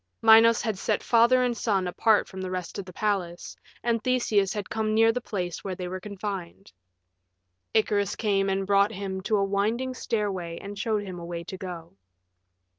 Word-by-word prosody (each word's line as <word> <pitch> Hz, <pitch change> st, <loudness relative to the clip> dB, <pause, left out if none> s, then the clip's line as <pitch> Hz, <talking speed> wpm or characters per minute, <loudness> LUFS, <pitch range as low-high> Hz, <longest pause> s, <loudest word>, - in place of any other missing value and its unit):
Minos 225 Hz, 0 st, +7 dB
had 220 Hz, -5 st, -2 dB
set -, -, -1 dB
father 240 Hz, +2 st, +4 dB
and 245 Hz, -1 st, 0 dB
son 200 Hz, -5 st, 0 dB
apart 215 Hz, +4 st, +2 dB
from 190 Hz, -, -8 dB
the 185 Hz, -, -4 dB
rest 185 Hz, +1 st, -5 dB
of 195 Hz, -, -5 dB
the 185 Hz, -, -10 dB
palace, 180 Hz, -4 st, -2 dB, 0.3 s
and 230 Hz, -2 st, 0 dB
Theseus 220 Hz, -6 st, +2 dB
had 205 Hz, -2 st, -4 dB
come 220 Hz, -1 st, -1 dB
near 225 Hz, +1 st, +5 dB
the 250 Hz, +2 st, -3 dB
place 180 Hz, -7 st, -4 dB
where 190 Hz, -2 st, -4 dB
they 180 Hz, 0 st, -5 dB
were 185 Hz, +1 st, -5 dB
confined. 195 Hz, -2 st, -6 dB, 1.0 s
Icarus 205 Hz, -3 st, +2 dB
came 195 Hz, -3 st, +1 dB
and 195 Hz, 0 st, 0 dB
brought 200 Hz, +1 st, +3 dB
him 190 Hz, -2 st, -4 dB
to 210 Hz, +3 st, +1 dB
a 200 Hz, -, +2 dB
winding 220 Hz, +6 st, 0 dB
stairway 195 Hz, -9 st, -3 dB
and 200 Hz, +1 st, -8 dB
showed 210 Hz, 0 st, -1 dB
him 185 Hz, -3 st, -7 dB
a 170 Hz, -, -7 dB
way 170 Hz, 0 st, -5 dB
to 180 Hz, -, -7 dB
go. 175 Hz, -3 st, -8 dB
200 Hz, 190 wpm, -26 LUFS, 185-220 Hz, 1.0 s, Minos